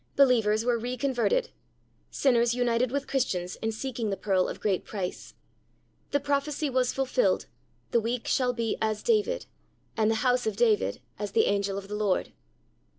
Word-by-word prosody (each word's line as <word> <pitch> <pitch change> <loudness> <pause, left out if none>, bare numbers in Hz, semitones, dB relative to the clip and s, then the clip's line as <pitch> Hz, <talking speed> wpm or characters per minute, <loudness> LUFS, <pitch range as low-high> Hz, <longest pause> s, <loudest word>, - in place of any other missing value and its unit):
Believers 230 -5 +4
were 240 -1 +2
re 245 +2 -3
converted. 280 - +1 0.6
Sinners 240 -3 +2
united 245 0 +1
with 280 +1 -1
Christians 185 -11 -1
in 225 - 0
seeking 230 -1 -3
the 195 - -2
pearl 190 -3 +1
of - - -6
great 195 -4 0
price. 190 -4 -5 0.7
The 285 - +1
prophecy 285 +1 -1
was 255 -1 +2
fulfilled. 270 - +1 0.5
The 235 - +4
weak 230 +2 -2
shall 255 -2 +2
be 230 -2 -2
"as 215 -1 -1
David," 475 +2 +1 0.5
and 220 -1 +2
the 225 - +2
house 250 -2 +2
of 215 - -1
David 215 - +2 0.2
"as 205 -1 -4
the 225 - +4
angel 200 -1 0
of 195 0 -6
the 205 - -7
Lord."' 210 -3 0
235 Hz, 165 wpm, -28 LUFS, 210-265 Hz, 0.7 s, Believers